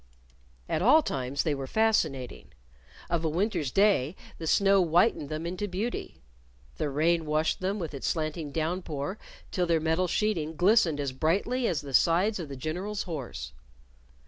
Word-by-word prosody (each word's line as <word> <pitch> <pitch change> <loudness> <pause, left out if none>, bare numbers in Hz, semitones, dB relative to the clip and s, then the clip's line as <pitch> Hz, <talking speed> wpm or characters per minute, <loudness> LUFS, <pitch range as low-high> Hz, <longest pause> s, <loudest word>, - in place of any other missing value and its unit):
At 155 - -1
all 290 - +6
times 135 - -2
they 155 - 0
were 135 -1 -4
fascinating. 160 - 0 0.5
Of 170 -1 -1
a 160 - +1
winter's 170 - 0
day 190 -4 +3 0.2
the 165 - -5
snow 195 +2 +4
whitened 170 -2 +2
them 155 +2 -4
into 185 +4 -3
beauty. 200 - -4 0.5
The 150 - -1
rain 160 +3 +1
washed 155 +1 +1
them 190 +3 -1
with 165 -6 -5
its 140 - -4
slanting 155 -2 -2
down 165 +4 -1
pour 155 +4 -5 0.3
till 180 -1 0
their 165 -1 +3
metal 160 +3 +1
sheeting 170 -5 -1
glistened 175 -4 +3
as 140 -2 -1
brightly 200 - 0
as 165 - 0
the 140 -2 -9
sides 185 - +3
of 160 -4 -6
the 140 - -6
General's 185 +9 -3
horse. 140 - -6
165 Hz, 165 wpm, -28 LUFS, 150-195 Hz, 0.5 s, all